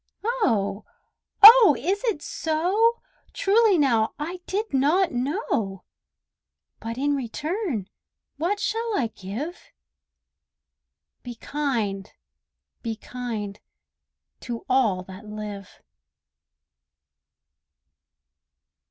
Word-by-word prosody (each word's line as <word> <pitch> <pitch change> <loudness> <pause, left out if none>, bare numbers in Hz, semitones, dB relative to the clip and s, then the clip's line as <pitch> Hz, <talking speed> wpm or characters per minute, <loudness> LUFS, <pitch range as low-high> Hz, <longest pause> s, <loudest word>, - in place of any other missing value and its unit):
Oh! 225 - 0 0.6
oh! 435 - +11
is 375 - -2
it 405 -11 -1
so? 375 +9 0 0.3
Truly 415 -1 +3
now, 235 -7 +2
I 345 +5 -5
did 420 -2 -3
not 320 +8 +2
know! 245 - -2 1.0
But 230 +1 -6
in 285 +2 +1
return 275 - -3 0.5
what 360 +7 -1
shall 450 0 -1
I 230 -4 -1
give? 235 - -7 1.5
"Be 245 -1 -8
kind, 230 -8 -3 0.7
be 225 -2 -3
kind, 220 -4 -6 0.8
to 235 -2 -6
all 220 -8 +2
that 190 +3 -12
live." 210 -2 -8
270 Hz, 85 wpm, -24 LUFS, -, 1.5 s, oh